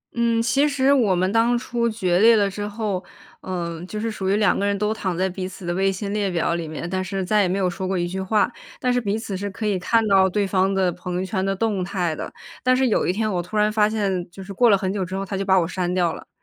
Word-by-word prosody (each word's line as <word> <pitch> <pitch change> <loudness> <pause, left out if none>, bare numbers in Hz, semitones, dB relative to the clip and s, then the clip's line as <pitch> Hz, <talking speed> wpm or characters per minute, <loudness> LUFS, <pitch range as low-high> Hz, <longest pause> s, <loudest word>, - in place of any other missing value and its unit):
嗯， 235 -1 +2
其 270 +6 +3
实 275 -1 +3
我 225 -9 +3
们 185 +2 +1
当 230 +2 +3
初 235 -1 -1
决 185 -6 0
裂 230 +3 +7
了 205 -2 +3
之 205 +1 -5
后， 205 -3 -3 0.4
嗯， 170 -2 -4
就 210 - -5
是 225 0 -2
属 190 -2 -3
于 195 - +3
2 205 -3 +3
个 - - -1
人 200 0 +1
都 210 +2 0
躺 190 -5 -3
在 190 +1 +1
彼 185 0 -4
此 190 0 -10
的 175 - -1
微 195 +2 +2
信 200 +1 -4
列 205 -2 0
表 170 -1 0
里 170 -1 -3
面， 155 +2 -5
但 185 +1 -2
是 190 0 -3
再 210 +3 +3
也 195 - +2
没 185 +2 -1
有 190 -2 +1
说 185 +1 -3
过 190 - -1
一 175 0 0
句 190 +2 -4
话， 210 +4 +1 0.3
但 250 -1 +1
是 245 - +1
彼 205 -1 -1
此 220 -3 -5
是 200 +2 -3
可 215 +3 -6
以 200 -3 +1
看 225 +5 +2
到 190 -2 +5
对 205 +2 0
方 190 0 +1
的 190 -2 +1
朋 180 +1 -6
友 185 +1 -1
圈 190 0 -2
的 195 0 0
动 205 -2 0
态 180 -4 -2
的。 - - -6 0.3
但 255 0 +3
是 260 -1 +3
有 215 - +1
一 180 - +2
天 215 +2 -1
我 180 -2 0
突 180 +5 -5
然 210 0 +3
发 210 -1 +3
现 195 -5 -1
就 190 +3 -10
是 200 +1 -8
过 240 +4 +4
了 200 - +6
很 190 -1 -2
久 200 -2 -1
之 185 +1 -5
后， 195 0 -3
她 195 - -5
就 195 - -1
把 190 -1 +4
我 170 - 0
删 180 0 -2
掉 175 -3 +1
了。 - - -10
195 Hz, 315 characters per minute, -22 LUFS, 185-215 Hz, 0.4 s, 裂